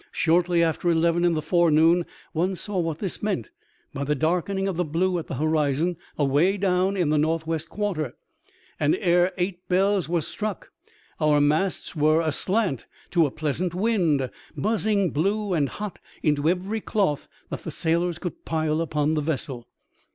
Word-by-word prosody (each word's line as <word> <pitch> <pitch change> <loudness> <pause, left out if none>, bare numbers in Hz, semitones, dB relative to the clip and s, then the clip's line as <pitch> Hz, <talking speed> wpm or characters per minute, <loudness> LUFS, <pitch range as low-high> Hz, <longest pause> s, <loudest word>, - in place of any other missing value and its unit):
Shortly 170 +1 +2
after 165 +1 0
eleven 170 +1 +2
in 175 -1 +3
the 155 - -2
forenoon 165 +1 +4 0.3
one 180 +4 0
saw 200 +1 -3
what 165 -3 -1
this 190 0 -3
meant 195 - -2 0.4
by 140 - -3
the 150 +1 0
darkening 180 +6 0
of 190 - -2
the 180 - +1
blue 175 +3 0
at 165 - -7
the - - -4
horizon 155 +3 +1 0.2
away 150 +7 +2
down 190 0 +1
in 175 -5 +1
the 155 - +3
north 160 +1 0
west 165 0 -3
quarter; 185 - -2 0.6
and 145 - +3
ere 175 -1 +3
eight 180 0 -3
bells 190 -1 +2
were 170 -1 +1
struck 210 +2 -5 0.5
our 150 -2 +4
masts 155 +7 0
were 155 +1 +3
aslant 170 - 0 0.2
to 170 -4 +4
a - - -4
pleasant 160 +5 -2
wind, 175 - +1 0.3
buzzing 210 -3 +1
blue 200 +5 0
and 145 -5 +1
hot 210 -3 -6 0.2
into 150 0 +2
every 190 +5 -1
cloth 190 -11 0 0.2
that - - -4
the - - -6
sailors 170 +1 0
could 175 -1 -6
pile 155 -1 0
upon 155 -2 0
the 155 - +1
vessel. 140 -5 -3
170 Hz, 165 wpm, -25 LUFS, 155-185 Hz, 0.6 s, forenoon